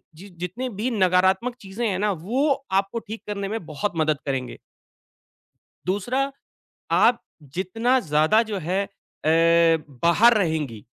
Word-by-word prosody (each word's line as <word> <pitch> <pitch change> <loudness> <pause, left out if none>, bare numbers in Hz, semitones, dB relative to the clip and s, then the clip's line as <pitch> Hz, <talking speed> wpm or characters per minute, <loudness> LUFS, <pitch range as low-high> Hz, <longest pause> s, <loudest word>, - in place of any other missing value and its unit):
जि 190 +6 -12
जितनी 185 +9 -4
भी 235 +4 0
नकारात्मक 190 +3 +2
चीज़ें 205 +4 -3
हैं 190 -2 -1
ना 210 0 +1
वो 235 - 0 0.3
आपको 200 +4 -4
ठीक 220 0 -9
करने 200 -1 -3
में 220 -5 -4
बहुत 160 +7 -3
मदद 155 -2 +1
करेंगे। 135 -3 -3 1.3
दूसरा, 245 +9 0 0.6
आप 240 0 +4 0.3
जितना 225 +8 +1
ज़्यादा 155 +6 +3
जो 205 - -2
है 185 +3 -1
अ, 195 -5 -9 0.7
बाहर 220 +8 +5
रहेंगी, 155 - -1
195 Hz, 130 wpm, -24 LUFS, 170-230 Hz, 1.3 s, बाहर